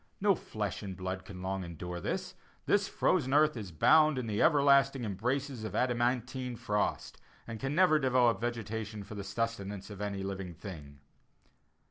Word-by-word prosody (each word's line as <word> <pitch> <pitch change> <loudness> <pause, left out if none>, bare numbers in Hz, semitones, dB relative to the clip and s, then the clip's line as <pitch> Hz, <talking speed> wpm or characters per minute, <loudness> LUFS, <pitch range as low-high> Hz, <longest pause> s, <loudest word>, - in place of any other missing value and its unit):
No 200 0 +4
flesh 105 - -4
and 95 -3 -6
blood 95 0 -4
can 90 -2 -9
long 95 0 -2
endure 85 +1 -6
this; 185 -1 -3 0.3
this 205 -1 +2
frozen 140 -6 +1
earth 150 0 +4
is 105 -6 -6
bound 155 - +5
in 125 - -2
the 105 -2 -1
everlasting 140 -4 +4
embraces 125 +5 -2
of 110 - -5
adamantine 125 0 0
frost, 105 -3 -2 0.3
and 115 -2 -7
can 135 +4 -2
never 175 -3 +5
develop 125 -6 +3
vegetation 110 -3 -4
for 105 +3 -10
the 100 -1 -5
sustenance 100 -1 -3
of 105 -1 -8
any 100 -1 -3
living 95 -3 -5
thing." 75 -6 -10
115 Hz, 160 wpm, -31 LUFS, 95-135 Hz, 0.3 s, bound